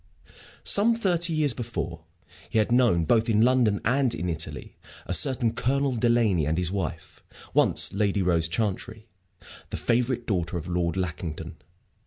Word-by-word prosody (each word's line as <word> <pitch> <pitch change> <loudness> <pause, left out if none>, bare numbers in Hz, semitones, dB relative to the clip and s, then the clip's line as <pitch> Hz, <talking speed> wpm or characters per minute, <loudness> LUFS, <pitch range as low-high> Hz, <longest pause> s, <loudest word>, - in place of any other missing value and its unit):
Some 225 +3 +3
thirty 175 -6 0
years 155 -4 +1
before, 85 -9 -5 0.4
he 115 - -2
had 110 +2 +2
known, 120 -10 +3
both 115 +5 +2
in 110 0 +3
London 120 -5 +3
and 130 +1 +2
in 90 - -3
Italy, 80 -3 -4 0.3
a - - -3
certain 115 +6 +2
Colonel 135 +2 0
Delaney 115 -9 +2
and 80 +2 0
his 90 -1 -1
wife, 95 -6 -5 0.3
once - - +3
Lady 100 -1 0
Rose 85 -2 +1
Chantrey, 110 +4 -3 0.6
the - - -4
favorite 120 0 0
daughter 90 -4 -2
of 85 - -6
Lord 85 -1 -1
Lackington. 85 -3 -5
110 Hz, 150 wpm, -26 LUFS, 90-125 Hz, 0.6 s, Some